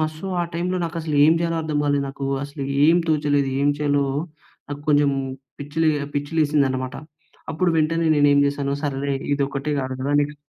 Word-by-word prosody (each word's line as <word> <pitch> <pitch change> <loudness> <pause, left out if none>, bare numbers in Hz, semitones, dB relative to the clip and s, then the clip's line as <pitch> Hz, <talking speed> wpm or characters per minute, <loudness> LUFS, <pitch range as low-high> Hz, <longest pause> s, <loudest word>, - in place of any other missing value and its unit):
So, 155 - -9 0.2
ఆ - - +1
టైమ్‌లో 180 +2 -1
నాకసలు 165 -2 -3
ఏం 160 - +6
జెయాలో 165 0 -1
అర్థం 155 -2 -2
కాలేదు 145 -1 +1
నాకు. 135 0 -6 0.2
అసలు 140 0 -6 0.2
ఏం 165 +2 +5
తోచలేదు. 145 -3 +1
ఏం 145 - +3
చేయాలో, 145 -1 +1 0.6
నాకు 145 0 -6
కొంచెం 145 -1 +4 0.5
పిచ్చి‌ 145 +2 -9
లె 155 - +5 0.3
పిచ్చి 145 +1 -2
లేసిందనమాట. 135 -4 +1 0.6
అప్పుడు 175 +3 +1
వెంటనే 165 +1 +1
నేనేమి 145 -1 +4
జెసాను, 140 0 -2
సరేలే! 140 -1 -1 0.2
ఇదొక్కటే 140 +1 -2
కాదు 130 -1 -3
కదా! 140 +2 -2
నెక్స్ట్ 150 +1 -4
145 Hz, 165 wpm, -22 LUFS, 140-155 Hz, 0.6 s, ఏం